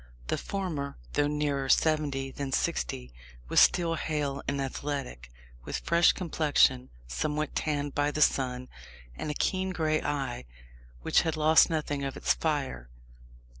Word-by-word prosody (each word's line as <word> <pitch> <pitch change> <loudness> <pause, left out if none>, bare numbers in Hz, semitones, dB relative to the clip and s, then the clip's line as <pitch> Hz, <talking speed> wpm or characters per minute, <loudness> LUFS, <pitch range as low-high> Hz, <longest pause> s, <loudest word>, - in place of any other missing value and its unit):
The - - +1
former, 165 -8 -4 0.2
though 145 - +2
nearer 145 -2 -1
seventy 145 -4 +2
than 140 0 -5
sixty, 60 - -2 0.4
was - - +4
still 170 -2 +4
hale 150 -3 -2
and 140 0 -1
athletic, 135 - -4 0.3
with - - -3
fresh 170 +1 +4
complexion, 150 -7 +2 0.2
somewhat 150 - -2
tanned 145 -2 -1
by 145 0 +1
the 150 - -4
sun, 125 -1 0 0.5
and 150 - -5
a 150 - -3
keen 190 +4 0
grey 155 -4 0
eye, 135 - -3 0.6
which - - +4
had 160 -1 -2
lost 155 +3 +6
nothing 150 -3 -2
of 135 -1 -4
its - - +2
fire. 135 - -2
145 Hz, 140 wpm, -29 LUFS, 135-155 Hz, 0.6 s, lost